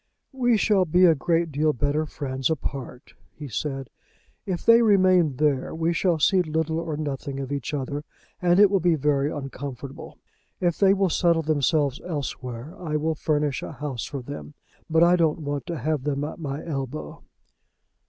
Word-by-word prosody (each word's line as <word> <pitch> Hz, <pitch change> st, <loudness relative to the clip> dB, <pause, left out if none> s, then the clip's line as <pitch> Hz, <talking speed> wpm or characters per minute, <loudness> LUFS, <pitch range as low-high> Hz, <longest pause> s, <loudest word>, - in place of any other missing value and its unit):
"We 245 Hz, -3 st, +2 dB
shall 200 Hz, -3 st, +3 dB
be 180 Hz, +3 st, +4 dB
a 165 Hz, -, +7 dB
great 165 Hz, +2 st, 0 dB
deal 150 Hz, +2 st, +1 dB
better 145 Hz, +4 st, 0 dB
friends 135 Hz, -2 st, -3 dB
apart," 135 Hz, -4 st, -5 dB, 0.2 s
he 150 Hz, -, -8 dB
said. 135 Hz, +1 st, -4 dB, 0.6 s
"If 180 Hz, -3 st, -3 dB
they 230 Hz, +1 st, +7 dB
remain 185 Hz, -, +4 dB
there 140 Hz, -1 st, 0 dB
we 165 Hz, +1 st, 0 dB
shall 175 Hz, -1 st, +1 dB
see 185 Hz, +5 st, +4 dB
little 160 Hz, -1 st, -1 dB
or 165 Hz, -3 st, -4 dB
nothing 140 Hz, -2 st, -4 dB
of 135 Hz, 0 st, -5 dB
each 140 Hz, -4 st, -3 dB
other, 145 Hz, 0 st, -3 dB, 0.4 s
and 175 Hz, +1 st, +4 dB
it 205 Hz, -1 st, +7 dB
will 195 Hz, -, +3 dB
be 175 Hz, -1 st, +3 dB
very 145 Hz, 0 st, +1 dB
uncomfortable. 135 Hz, -1 st, -7 dB, 0.4 s
If 175 Hz, -2 st, 0 dB
they 195 Hz, -1 st, +5 dB
will 195 Hz, -3 st, +1 dB
settle 170 Hz, -2 st, +2 dB
themselves 145 Hz, -2 st, +1 dB
elsewhere, 140 Hz, -4 st, -5 dB
I 160 Hz, -4 st, -3 dB
will 155 Hz, +2 st, 0 dB
furnish 150 Hz, -2 st, -1 dB
a -, -, -6 dB
house 140 Hz, -6 st, -5 dB
for 140 Hz, -3 st, -6 dB
them; 145 Hz, +2 st, -8 dB, 0.3 s
but 160 Hz, +1 st, +4 dB
I 175 Hz, +1 st, +6 dB
don't 160 Hz, -1 st, +1 dB
want 145 Hz, +1 st, -4 dB
to 170 Hz, -2 st, -3 dB
have 150 Hz, +1 st, -1 dB
them 145 Hz, 0 st, -1 dB
at 150 Hz, -, -5 dB
my 145 Hz, -2 st, -5 dB
elbow." 140 Hz, -2 st, -5 dB
155 Hz, 175 wpm, -25 LUFS, 140-170 Hz, 0.6 s, a